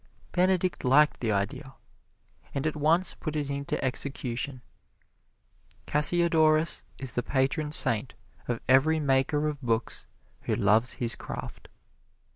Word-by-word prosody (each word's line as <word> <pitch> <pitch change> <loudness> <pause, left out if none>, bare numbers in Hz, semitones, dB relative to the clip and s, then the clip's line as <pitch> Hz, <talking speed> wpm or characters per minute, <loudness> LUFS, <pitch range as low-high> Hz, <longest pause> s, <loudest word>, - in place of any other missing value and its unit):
Benedict 185 0 +1
liked 145 +4 +4
the 115 -3 -1
idea, 100 +6 -3 0.8
and 140 - -2
at 155 - -1
once 160 +5 +1
put 155 -2 -6
it 145 -2 -2
into 140 0 -3
execution. 130 -1 -3 1.2
Cassiodorus 160 0 +2 0.2
is 130 -3 -7
the 125 - 0
patron 140 +4 -1
saint 120 -5 +2 0.3
of 120 -2 -2
every 145 +5 +4
maker 145 +1 +1
of 150 -2 -4
books 115 -2 -2 0.4
who - - 0
loves 110 +4 +2
his 120 -1 +3
craft. - - -8
140 Hz, 120 wpm, -27 LUFS, 125-155 Hz, 1.2 s, liked